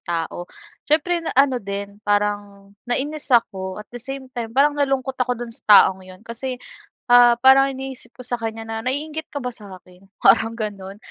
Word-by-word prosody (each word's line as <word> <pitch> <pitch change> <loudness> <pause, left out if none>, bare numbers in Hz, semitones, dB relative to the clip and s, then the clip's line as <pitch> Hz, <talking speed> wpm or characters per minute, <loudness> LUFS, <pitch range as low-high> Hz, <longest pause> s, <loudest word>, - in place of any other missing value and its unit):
tao. 175 +1 -4 0.4
Siyempre, 335 +3 +2
na 330 - -5
ano 270 -3 +3
din, 200 +1 -6
parang 205 -1 -2 0.2
nainis 290 +5 -2
ako 190 -7 +1
at 210 - -8
the 245 - -6
same 265 +1 -7
time 235 -2 -4
parang 290 +2 +5
nalungkot 270 -2 -1
ako 250 0 0
do'n 235 0 -7
sa 250 - -7 0.2
taong 190 0 +4
'yon. 185 +2 -14
Kasi, 250 +3 -5 0.6
ah, 240 -1 +7
parang 265 +1 +6
iniisip 265 -2 -9
ko - - -9
sa 245 0 -1
kanya 225 0 -5
na, 225 0 -5
"Naiinggit 300 +4 -3
ka 285 - -4
ba 250 - -3
sa'kin?" 190 -3 -14
Parang 225 0 +4
gano'n. 200 -3 -6
235 Hz, 180 wpm, -21 LUFS, 200-270 Hz, 0.6 s, ah